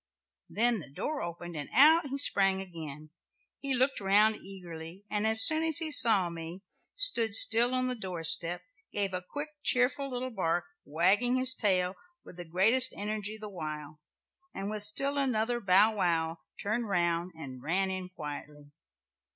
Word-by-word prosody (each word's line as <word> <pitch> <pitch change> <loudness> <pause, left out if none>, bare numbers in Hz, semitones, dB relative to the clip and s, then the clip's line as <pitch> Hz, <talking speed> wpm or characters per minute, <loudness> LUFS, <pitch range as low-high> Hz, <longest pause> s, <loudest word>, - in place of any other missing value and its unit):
then 235 0 0
the 150 - -13
door 290 - -6
opened 170 0 -8
and 145 -2 -8
out 310 +3 +5
he 275 +1 -6
sprang 195 -8 +2
again. 155 -5 -11 0.5
He 275 -2 -3
looked 260 +2 -1
round 210 +2 +2
eagerly, 180 -2 -11
and 210 +1 -1
as 220 0 +7
soon 315 0 +7
as 320 -2 +2
he 325 -2 -2
saw 220 -10 +5
me 170 +2 -10 0.3
stood 370 - +2
still 235 +3 +6
on 255 0 -2
the 255 - -3
doorstep, 175 -4 +1 0.3
gave 200 -2 -3
a 180 - -4
quick 290 - -8
cheerful 270 +2 -1
little 255 0 -6
bark, 175 -5 -2 0.2
wagging 195 - 0
his 255 0 +5
tail 185 -5 -1 0.3
with 180 - -15
the 175 - -9
greatest 220 +10 +3
energy 210 +1 -6
the 215 0 -9
while, 155 -5 -9 0.6
and 195 +2 -6
with 215 -1 -5
still 275 +7 +1
another 240 -3 -2
'bow 205 +1 +3
wow,' 165 -4 -2 0.2
turned 220 +2 -4
round 175 -1 -2
and 135 -5 -11
ran 190 +6 -2
in 185 -1 -7
quietly. 150 -3 -11
195 Hz, 160 wpm, -28 LUFS, 170-245 Hz, 0.6 s, as